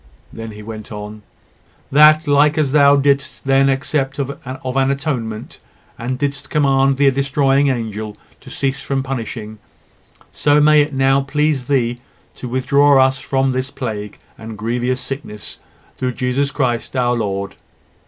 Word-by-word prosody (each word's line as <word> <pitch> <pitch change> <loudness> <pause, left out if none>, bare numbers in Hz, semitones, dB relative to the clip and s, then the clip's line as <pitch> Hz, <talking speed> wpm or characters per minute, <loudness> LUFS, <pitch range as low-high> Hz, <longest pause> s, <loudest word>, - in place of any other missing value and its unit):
He - - -15
then 110 -2 -8
went 110 -1 -8
on 105 0 -8 0.7
"That, 155 +2 +6
like 145 +1 +3
as 145 -4 +1
Thou 140 -1 +6
didst 140 0 0
then 135 0 +3
accept 135 +1 -1
of 140 0 -3
an 130 +1 -6 0.3
atonement, 135 -6 -4 0.4
and 125 +2 -4
didst 140 0 -3
command 135 -2 +2
the 140 -1 +4
destroying 140 +1 +2
angel 110 -4 -3 0.2
to - - -14
cease 135 0 -2
from 135 -1 -2
punishing, 115 -4 -6 0.7
so 145 0 +2
it - - +4
may 150 0 +5
now 135 -1 +2
please 140 -2 -1
thee 120 -3 0 0.4
to 125 - -6
withdraw 135 +1 +4
from 135 0 -1
us - - -1
this 130 +1 -2
plague 105 -6 -6 0.2
and 110 -1 -8
grievous 120 +4 -1
sickness; 130 -7 -7 0.4
through 125 -1 -2
Jesus 130 +3 -1
Christ, 125 -3 -2
our 120 -1 +1
Lord." 100 -3 -3
135 Hz, 145 wpm, -18 LUFS, 120-140 Hz, 0.7 s, That